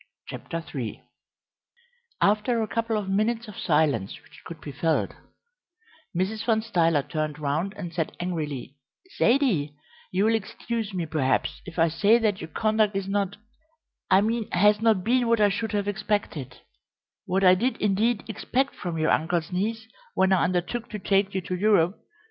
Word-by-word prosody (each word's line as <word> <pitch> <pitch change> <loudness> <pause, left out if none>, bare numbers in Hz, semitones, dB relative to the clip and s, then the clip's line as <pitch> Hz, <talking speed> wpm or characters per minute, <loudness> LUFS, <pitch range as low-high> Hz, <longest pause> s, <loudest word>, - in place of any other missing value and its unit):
CHAPTER 165 0 -6
III 125 -7 -5 1.2
After 215 +3 +2
a - - -3
couple 230 0 -1
of 205 -2 -3
minutes 220 +4 0
of 210 - -10
silence 150 - +1
which - - -17
could 165 -2 -8
be 145 - -8
felt, 160 +4 0 1.1
Mrs. 210 +4 -1
Van 225 -2 +1
Stuyler 165 -9 +2
turned 155 -1 -3
round 155 +7 -2
and 175 -4 -6
said 165 -2 -3
angrily: 150 -6 -4 0.4
"Zaidie, 215 - +2 0.4
you 190 +3 +2
will 225 - +3
excuse 225 0 -3
me, 180 -3 -2
perhaps, 150 -4 0
if 180 - -9
I 165 0 +4
say 205 +8 +4
that 215 -4 0
your - - -5
conduct 215 +4 +1
is 195 -1 -2
not 200 0 -1 0.7
I 190 - +6
mean 225 +1 -1
has 210 +3 +4
not 220 -5 +3
been 245 +2 +2
what 230 -1 +3
I 205 -1 +5
should 220 +3 -2
have 205 -1 0
expected 205 - -2 0.7
what 190 +2 +1
I 185 -1 +8
did, 240 +8 0
indeed, 210 +3 +1
expect 250 +5 -1
from 175 -3 -4
your 155 0 +2
uncle's 165 +1 0
niece 220 +5 -2 0.3
when 190 0 +3
I 190 - +3
undertook 185 +7 -2
to 215 - -5
take 195 0 +1
you 190 - 0
to 180 +1 -4
Europe. 195 -2 +2
195 Hz, 165 wpm, -26 LUFS, 165-220 Hz, 1.2 s, I